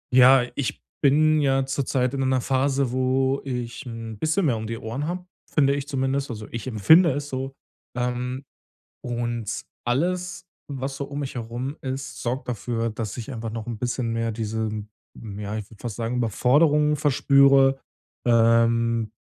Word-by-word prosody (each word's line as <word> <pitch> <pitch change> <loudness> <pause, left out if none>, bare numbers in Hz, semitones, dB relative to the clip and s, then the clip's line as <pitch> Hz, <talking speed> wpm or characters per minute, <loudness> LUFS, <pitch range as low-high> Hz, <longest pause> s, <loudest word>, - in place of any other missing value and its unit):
Ja, 130 0 +7
ich 140 - -3 0.2
bin 155 +2 +4
ja 135 -1 +2
zurzeit 130 -1 0
in 135 - -1
einer 130 -1 +2
Phase, 135 0 +1
wo 130 +1 +1
ich 125 -3 -4
'n 115 -2 -7
bisschen 160 - +1
mehr 125 -6 +2
um 110 0 -5
die 115 +1 -4
Ohren 120 +7 -4
habe, 180 +1 -4 0.3
finde 140 -2 +3
ich 140 0 -3
zumindest, 135 0 -1
also 110 -3 -6
ich 115 +2 -5
empfinde 150 - +6
es 145 +1 -4
so, 135 0 -4 0.4
ähm, 125 +2 -2 0.6
und 120 -3 -3 0.3
alles, 180 +8 -1 0.2
was 135 -1 -4
so 140 - -3
um 145 +1 -5
mich 140 0 -4
herum 120 +4 -5
ist, 135 0 -5
sorgt 125 +3 -3
dafür, 115 0 -2
dass 110 0 -5
ich 120 +3 -6
einfach 115 -1 -4
noch 110 -1 -5
'n 115 -3 -5
bisschen 120 -1 -1
mehr 115 0 -1
diese, 110 0 -2 0.5
hm, 105 -3 -8
ja, 105 0 -4
ich 105 -2 -6
würde 110 - -15
fast 115 -4 -4
sagen, 115 +3 -2
Überforderung 145 - +3
verspüre, 140 -2 +4 0.5
ähm, 115 -1 +3
130 Hz, 165 wpm, -24 LUFS, 115-140 Hz, 0.6 s, Ja